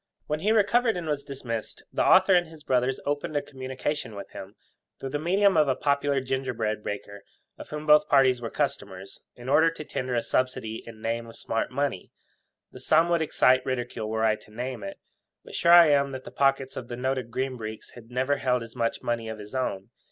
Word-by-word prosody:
When 150 0 -2
he 210 +6 +1
recovered 225 +1 +3
and 175 - -4
was 150 -2 -2
dismissed, 125 -5 -6
the - - +1
author 190 +1 +6
and 175 -1 +4
his 160 -2 -14
brothers 130 0 +1
opened 145 +1 -2
a - - +1
communication 130 -2 -4
with 100 - -8
him, 95 +2 -9 0.4
through 135 - -5
the 145 - -1
medium 195 +5 +3
of 155 -2 +4
a 135 - +2
popular 140 0 +1
ginger 130 0 -2
bread 110 -1 -2
baker, 100 0 -6 0.4
of - - -9
whom 150 0 -6
both 150 0 +5
parties 130 -3 +4
were 115 - -4
customers, 95 -2 -4
in 120 +1 -11
order 160 +4 +5
to 165 -1 -8
tender 130 -3 -3
a 115 - +1
subsidy 130 -3 -1
in 110 -1 -11
name 115 +1 -2
of 115 - -12
smart 115 - -2
money. 135 -7 -2 0.6
The - - -11
sum 165 +2 +3
would 170 -1 +2
excite 130 -4 +3
ridicule 120 -4 -3
were 110 0 -1
I 110 -1 +2
to - - -19
name 120 +1 -5
it; 100 - -6 0.5
but - - -12
sure 170 0 +4
I 170 -3 +9
am 140 -1 +2
that 130 0 -6
the - - -10
pockets 135 -1 +1
of 120 - -6
the 120 - -6
noted 130 -1 -2
Green 130 +2 -2
Breeks 110 -2 -8 0.2
never 130 +3 0
held 125 -2 0
as 115 +1 -12
much 115 -2 -1
money 115 -1 -2
of 110 - -5
his 105 +2 -11
own. 100 -7 -3
130 Hz, 215 wpm, -26 LUFS, 115-150 Hz, 0.6 s, I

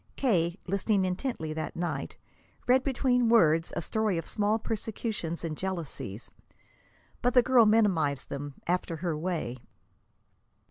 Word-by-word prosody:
K., 175 -9 +1
listening 200 +1 +1
intently 180 - -3
that 155 0 -4
night, 175 0 -3 0.5
read 255 +1 +4
between 250 -3 +2
words 165 -8 +4
a - - -2
story 215 -2 0
of 165 - -3
small 210 +1 +1
persecutions 215 -6 -4
and 160 -2 -3
jealousies. 160 - -5 0.9
But 245 +1 +1
the 250 - +7
girl 240 -3 +5
minimized 180 - +2
them, 140 0 -5
after 175 -1 -1
her 165 0 -2
way. 155 -7 -3
185 Hz, 130 wpm, -29 LUFS, 160-225 Hz, 0.9 s, the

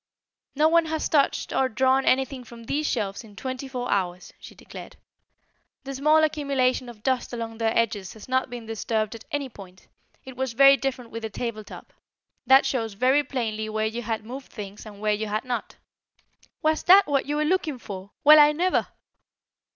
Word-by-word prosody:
"No 305 +3 +4
one 335 +1 +4
has 315 0 -2
touched 285 -3 +1
or 265 -1 +2
drawn 260 +3 +2
anything 265 0 +1
from 235 -1 -13
these 295 +6 -1
shelves 200 +2 -2
in 210 -2 -15
twenty 260 +4 -5
four 250 -2 -4
hours," 180 -2 -2
she - - -13
declared. - - -11 0.9
"The 275 - -6
small 305 +4 +3
accumulation 275 -5 0
of 220 -3 -13
dust 260 -2 -1
along 230 -1 -5
their 225 -1 0
edges 205 -5 -1
has 220 - -13
not 260 0 0
been 240 -2 -8
disturbed 220 0 -2
at 230 - -11
any 290 -3 -2
point. 190 -6 -14 0.4
It 260 -1 -10
was 260 -1 -3
very 275 +3 +7
different 260 -4 -4
with 230 - -6
the 220 - -4
table 220 -1 -5
top. - - -12 0.5
That 265 +1 +7
shows 225 -5 -2
very 260 +7 +3
plainly 220 -5 -3
where 215 0 -1
you 225 +2 -3
had 225 -1 -4
moved 260 +3 -9
things 205 0 -9
and 205 -1 -12
where 215 0 +1
you 215 +1 -3
had 215 +4 -3
not." 250 -1 -4 0.9
"Was 310 0 +2
that 385 +2 +8
what 280 -2 0
you 295 - -1
were 305 0 +1
looking 320 -4 0
for? 195 -4 -9
Well, 305 +1 +9
I 295 0 +7
never!" 360 +4 +1
250 Hz, 190 wpm, -25 LUFS, 220-275 Hz, 0.9 s, Well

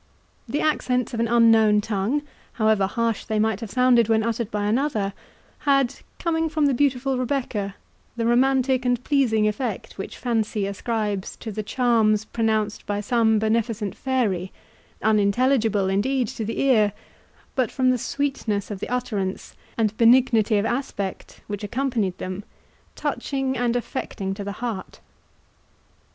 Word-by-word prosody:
The 290 - -1
accents 250 -6 0
of 230 - -3
an 230 - +2
unknown 225 -2 +5
tongue, 215 +7 -1 0.3
however 215 -3 +2
harsh 230 +1 -1
they 220 - -2
might 215 -1 +1
have 225 -3 -6
sounded 245 -1 +4
when 220 -1 +3
uttered 230 -1 -1
by 210 -2 -2
another, 215 -3 0 0.5
had, 275 -3 +2 0.2
coming 325 -1 0
from 310 -1 +1
the 280 - +3
beautiful 265 0 +1
Rebecca, 240 -6 -2 0.4
the 230 - 0
romantic 260 +1 +3
and 245 -1 0
pleasing 235 -8 +2
effect 215 -2 -4
which 195 - -6
fancy 220 -4 -1
ascribes 205 -1 -2
to 220 - -7
the 215 +1 -3
charms 220 -2 +2
pronounced 220 -2 -1
by 205 0 -1
some 220 +1 +2
beneficent 220 -1 0
fairy, 210 -9 -1 0.5
unintelligible, 215 0 +2
indeed, 240 +6 +1
to 225 - -5
the 225 - -3
ear, 220 -7 +3 0.6
but, 255 -5 +1
from 255 -1 +2
the 250 - 0
sweetness 225 -8 -2
of 195 -2 -6
utterance, 215 -6 -3 0.2
and 220 -2 +1
benignity 230 -3 +4
of 205 - +1
aspect, 225 -6 -4
which 205 0 -5
accompanied 235 -5 -1
them, 185 +2 -5 0.5
touching 270 -2 -2
and 245 -1 0
affecting 215 -5 -3
to 200 +1 -6
the 200 0 -4
heart. 215 -6 -5
225 Hz, 140 wpm, -24 LUFS, 210-255 Hz, 0.6 s, unknown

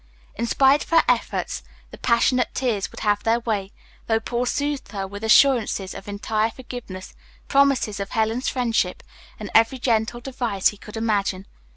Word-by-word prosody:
In 235 +2 -3
spite 275 +4 +4
of - - -17
her 330 -1 +5
efforts - - 0 0.3
the - - -10
passionate 250 +1 +2
tears 230 -7 -1
would - - -11
have 205 -1 +1
their 230 +1 +2
way, 205 -4 -2 0.4
though 225 -1 +2
Paul 240 +2 -2
soothed 285 -2 -2
her 195 -1 -3
with 200 +2 -9
assurances 220 -5 +3
of 195 - -10
entire 215 +2 -1
forgiveness, 230 -6 -9 0.3
promises 275 -7 +2
of 200 +1 -4
Helen's 225 +3 0
friendship, 230 -7 -1 0.4
and 210 -2 -7
every 230 +4 +4
gentle 235 -1 0
device 240 -6 0
he 205 - -10
could 210 +2 -10
imagine. 200 -4 -1
225 Hz, 165 wpm, -23 LUFS, 205-250 Hz, 0.4 s, her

